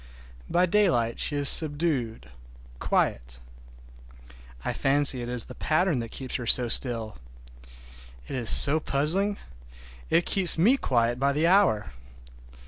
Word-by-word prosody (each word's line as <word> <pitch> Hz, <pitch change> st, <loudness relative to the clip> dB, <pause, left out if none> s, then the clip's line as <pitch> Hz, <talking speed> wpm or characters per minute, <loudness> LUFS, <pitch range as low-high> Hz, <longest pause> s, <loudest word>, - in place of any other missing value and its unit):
By 180 Hz, +1 st, +1 dB
daylight 170 Hz, -, -1 dB
she 145 Hz, -, -2 dB
is 145 Hz, -1 st, -1 dB
subdued, 145 Hz, -, -1 dB, 0.5 s
quiet. -, -, -3 dB, 1.3 s
I -, -, -3 dB
fancy 135 Hz, -2 st, +1 dB
it 120 Hz, -, -7 dB
is 125 Hz, -2 st, +1 dB
the -, -, -12 dB
pattern 160 Hz, -2 st, -1 dB
that 115 Hz, -1 st, -7 dB
keeps 130 Hz, +1 st, -6 dB
her 120 Hz, -2 st, -8 dB
so 125 Hz, +1 st, +3 dB
still. 115 Hz, -, 0 dB, 1.1 s
It -, -, -8 dB
is 120 Hz, -4 st, -2 dB
so 145 Hz, +3 st, +7 dB
puzzling. 175 Hz, +9 st, -1 dB, 0.7 s
It 175 Hz, -, +1 dB
keeps 185 Hz, -5 st, +2 dB
me 215 Hz, +11 st, +3 dB
quiet 120 Hz, -, -2 dB
by 140 Hz, +1 st, 0 dB
the 150 Hz, +3 st, -1 dB
hour. 175 Hz, -, +1 dB
140 Hz, 135 wpm, -24 LUFS, 120-170 Hz, 1.3 s, so